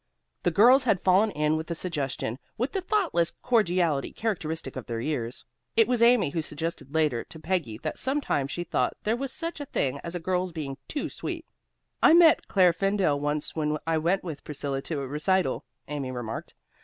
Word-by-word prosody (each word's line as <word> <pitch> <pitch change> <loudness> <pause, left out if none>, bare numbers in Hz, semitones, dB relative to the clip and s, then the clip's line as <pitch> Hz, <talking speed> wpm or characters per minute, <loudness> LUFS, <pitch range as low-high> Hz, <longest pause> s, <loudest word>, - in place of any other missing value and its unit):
The 175 - +2
girls 245 - +6
had 215 -6 +3
fallen 190 +4 +4
in 150 -4 +1
with 160 - -5
the 170 - -3
suggestion 140 -8 -3 0.2
with 245 +5 -1
the 385 - -1
thoughtless 355 - +1
cordiality 175 - +2
characteristic 160 - -3
of - - -6
their 115 -1 -3
years. 125 -3 -3 0.3
It 225 - +6
was 245 -1 +1
Amy 235 -10 +5
who 165 - -1
suggested 155 -2 -5
later 150 -7 +2
to 160 - -10
Peggy 160 - -1
that 155 - -3
sometimes 265 - 0
she 175 - -3
thought - - 0
there 220 +2 +1
was 265 +1 -4
such 335 0 -5
a 290 - -4
thing 140 - -1
as 170 +1 -5
a - - -2
girl's 180 +1 -1
being 145 -5 -5
too 290 - -2
sweet. - - -5 0.6
"I 320 - +7
met 335 -2 +6
Claire 180 -3 +4
Fendall 195 -5 +1
once 145 +1 -1
when 150 -1 0
I 165 -1 +1
went 175 +5 +1
with 160 -5 -6
Priscilla 140 -2 -3
to 145 0 -3
a 135 - -4
recital," 150 +2 0 0.2
Amy 145 -3 -3
remarked. 120 -3 -5
165 Hz, 190 wpm, -27 LUFS, 145-210 Hz, 0.6 s, I